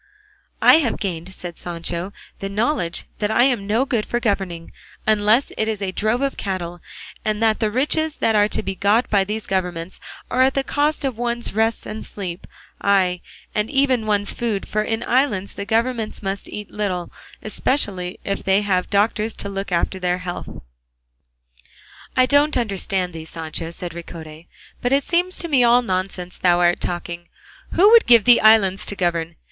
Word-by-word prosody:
"I - - +8
have 255 -8 0
gained," 180 -2 -4
said 175 -2 -8
Sancho, 170 +2 -4 0.3
"the 195 - -4
knowledge 205 - 0 0.2
that 210 - 0
I 220 +2 +4
am 245 -7 +1
no 225 +6 +2
good 235 -5 0
for 240 - -2
governing, 195 -7 -2 0.3
unless 215 +4 +3
it 220 - +1
is 220 -2 -2
a 195 -2 -2
drove 215 +6 0
of 275 - -1
cattle, 175 -3 -4 0.4
and 215 -1 -1
that 220 -1 +3
the 215 - +1
riches 300 +6 0
that 225 - +1
are 205 0 +4
to - - -2
be 195 - -3
got 205 +5 +1
by 200 -2 +4
these 210 +2 -4
governments 180 -2 -3 0.3
are 255 - -1
got 260 - +6
at 265 - -1
the 275 - +1
cost 295 +3 0
of 250 -4 -3
one's 240 -2 -2
rest 225 +1 0
and 215 - -6
sleep, 180 -3 -7 0.3
ay 185 -3 +2 0.3
and 210 0 0
even 265 -5 +1
one's 205 -1 +2
food; 225 -5 -2
for 215 - 0
in 225 +2 -2
islands 235 -7 +1
the 200 - -5
governors 225 0 -1
must 195 0 -4
eat 210 -1 -7
little, 185 -4 -3 0.3
especially 200 -6 -1
if 200 - -3
they 195 +2 +2
have 185 -3 0
doctors 215 +2 +1
to 200 - -6
look 195 -1 -5
after 180 +2 0
their 180 -1 0
health." 180 -1 -6 1.7
"I 255 - +6
don't 285 +3 +3
understand 195 -5 -1
thee, 160 -1 -7
Sancho," 165 0 -5
said 170 +1 -6
Ricote; 165 -1 -10 0.3
"but 245 - 0
it 275 +1 +3
seems 355 +2 +1
to 340 - -1
me 275 -6 +3
all 240 +1 +5
nonsense 185 -3 -3
thou 175 -1 +3
art 175 0 +3
talking. 175 0 -4 0.4
Who 395 +5 +6
would 465 -1 +7
give 235 -3 +7
thee 245 +2 +7
islands 215 -3 +5
to 205 - -2
govern? 170 -3 -1
205 Hz, 185 wpm, -21 LUFS, 180-235 Hz, 1.7 s, I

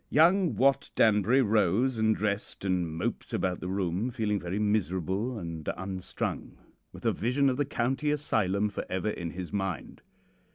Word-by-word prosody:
"Young 175 +3 +4
Wat 135 +1 +3
Danbury 110 +5 +4
rose 110 +3 +2
and 110 0 +3
dressed 100 -1 -3
and 90 -3 +1
moped 85 +9 -4
about 90 -1 -1
the - - -5
room 95 +3 -1
feeling 105 -4 -1
very 90 +2 -3
miserable 105 +2 0
and 85 -5 -5
unstrung, 95 0 -4 0.3
with - - -12
a - - +4
vision 130 +5 +1
of 125 - -3
the 145 - +1
County 135 +3 -1
Asylum 105 -9 +1
for 100 - -4
ever 95 +3 -1
in 85 -4 -4
his 90 +2 -7
mind. 95 -6 -3
105 Hz, 160 wpm, -29 LUFS, 95-125 Hz, 0.3 s, Young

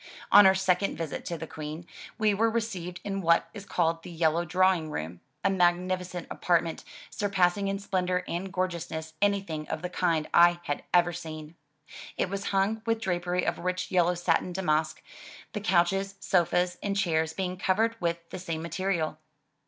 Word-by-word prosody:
On 205 -1 +9
our 190 - +5
second 190 +1 +1
visit 165 -3 -4
to 170 - -3
the 160 - -6
Queen, 155 +2 -7 0.3
we 215 -1 +3
were 225 +3 +2
received 195 -6 -3
in 195 -1 -3
what 170 -1 +3
is 200 -2 -9
called 165 -3 0
the - - -10
"Yellow 165 0 +1
Drawing 180 -2 +2
Room,'' 85 - -5 0.2
a - - +3
magnificent 180 -1 0
apartment, 170 -2 0 0.3
surpassing 195 -1 +1
in 195 0 -1
splendor 185 -2 -1
and 185 +3 -3
gorgeousness 170 -4 -3
anything 195 -7 0
of 160 +1 -4
the 180 - -3
kind 165 -4 +1
I 175 0 +6
had 145 -3 -2
ever 175 0 +4
seen. 155 -2 -7 0.6
It - - 0
was 200 0 -3
hung 200 +3 +1
with 225 0 +1
drapery 180 -3 -1
of - - -1
rich 185 +1 -2
yellow 180 -1 +3
satin 175 +1 0
damask, 160 -4 0 0.5
the 210 - -3
couches, 195 +1 +1
sofas 180 -1 +1
and 200 -1 -1
chairs 160 -4 +1
being 185 0 -2
covered 215 +5 +1
with 170 -1 -2
the - - -5
same 165 -3 -4
material. 170 -2 -2
180 Hz, 170 wpm, -28 LUFS, 165-195 Hz, 0.6 s, On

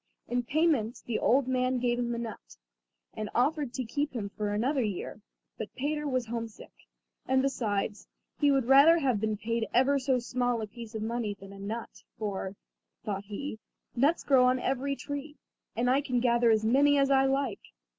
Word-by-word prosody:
In 245 0 0
payment 265 -3 +1
the 235 - -1
old 260 +1 +3
man 255 0 +1
gave 240 0 0
him 240 -1 -1
a - - -4
nut, 225 - -7 0.6
and 215 -1 -4
offered 285 +2 +1
to 260 - -2
keep 290 +5 -2
him 210 -5 -3
for 210 +1 -3
another 255 +7 +1
year; 210 -1 -4 0.4
but 215 - -6
Peter 295 +2 -2
was 255 -3 0
home 230 0 -3
sick; 220 - -14 0.6
and, 260 0 +3
besides, 215 -6 -2 0.3
he 290 - +4
would 270 -3 +3
rather 280 +6 +7
have 255 -9 +1
been 215 -1 0
paid 230 +1 -2
ever 275 +3 +4
so 260 -1 +1
small 245 0 -1
a 220 - -2
piece 230 +1 -10
of 215 - -3
money 225 -2 -2
than 195 0 -12
a 195 - -11
nut; 220 +4 -6 0.2
for, 200 -2 -4 0.5
thought 200 -2 -3
he, 220 +3 -6 0.4
nuts 285 +7 +2
grow 260 -3 +5
on 255 0 +3
every 270 +2 -1
tree, 285 +2 -6 0.4
and 240 +2 0
I 265 +3 +3
can 255 -4 0
gather 235 -1 +3
as 220 -1 +3
many 285 +5 +4
as 275 0 +3
I 270 0 +5
like. 270 -5 -1
245 Hz, 190 wpm, -29 LUFS, 220-275 Hz, 0.6 s, rather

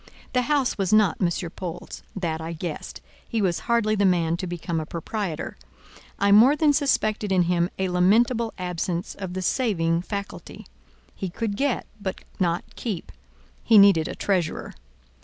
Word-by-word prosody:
The 250 - +3
house 280 -7 +1
was 190 -2 0
not 215 -5 +4
M. 180 - +3 0.2
Paul's—that 170 -1 -5
I 165 +1 -5
guessed: 165 -1 -6 0.3
he 230 - -1
was 185 -4 +1
hardly 230 -2 +3
the 205 -1 +1
man 170 -3 +2
to 185 - -4
become 170 -1 -3
a 155 - -4
proprietor; 170 0 -4 0.6
I 200 0 +2
more 235 +8 +7
than 300 -1 +3
suspected 215 -8 +1
in 185 -2 +4
him 175 0 +1
a 190 - 0
lamentable 220 +6 +3
absence 180 0 -3
of 190 -2 -6
the 185 - -2
saving 170 -8 +1
faculty; 200 +1 -7 0.5
he 190 - -4
could 210 +3 -3
get, 270 +2 0 0.2
but 190 -2 -4 0.2
not 175 -2 +1
keep; 205 -8 -5 0.5
he 225 - +5
needed 195 -6 +6
a - - -5
treasurer. 180 -5 -1
190 Hz, 160 wpm, -25 LUFS, 170-215 Hz, 0.6 s, more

